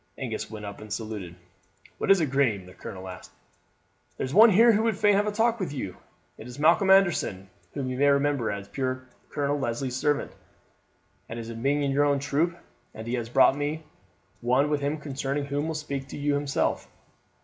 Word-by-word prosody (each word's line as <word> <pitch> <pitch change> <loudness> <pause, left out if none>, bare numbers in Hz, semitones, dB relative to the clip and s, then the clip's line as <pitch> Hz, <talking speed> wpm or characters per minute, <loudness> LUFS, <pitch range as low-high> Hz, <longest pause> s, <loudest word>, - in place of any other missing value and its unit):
Angus - - -4
went 105 -1 -8
up 100 +1 -8
and 110 -1 -11
saluted. 105 -5 -5 0.6
"What - - -2
is 195 -1 +7
it, 150 -5 0
Graeme?" 120 -9 +1
the 90 - -13
colonel 95 0 -8
asked. 90 -1 -9 0.9
"There's 130 +1 -3
one 220 +5 +8
here 225 +4 +6
who 215 0 +2
would 225 -3 0
fain 210 0 +4
have 205 +1 +2
a - - +1
talk 230 +2 +1
with 185 - -3
you. 115 -10 -5 0.4
It 110 - -9
is 125 +1 -10
Malcolm 165 +6 +4
Anderson, 165 - +3 0.2
whom 140 -3 -2
you 130 0 -3
may 145 - +4
remember 140 -3 +2
as 100 -1 -5
puir 130 +2 -3 0.2
Colonel 145 0 -1
Leslie's 125 0 -2
servant, 145 +2 0 1.0
and 115 - -6
as 115 0 -6
being 140 +6 0
in 140 - 0
your 145 +2 +3
own 145 -1 +2
troop, 150 +5 0 0.4
and 110 - -7
he 120 - -3
has 120 -2 -2
brought 130 - +5 0.9
one 130 +5 +2
with 145 -1 0
him 145 +2 -1
concerning 140 -1 -3
whom 140 +1 -2
he - - -3
will 160 - -3
speak 140 -3 -4
to - - -8
you 145 0 0
himself." 145 -1 -1
140 Hz, 200 wpm, -26 LUFS, 115-150 Hz, 1.0 s, one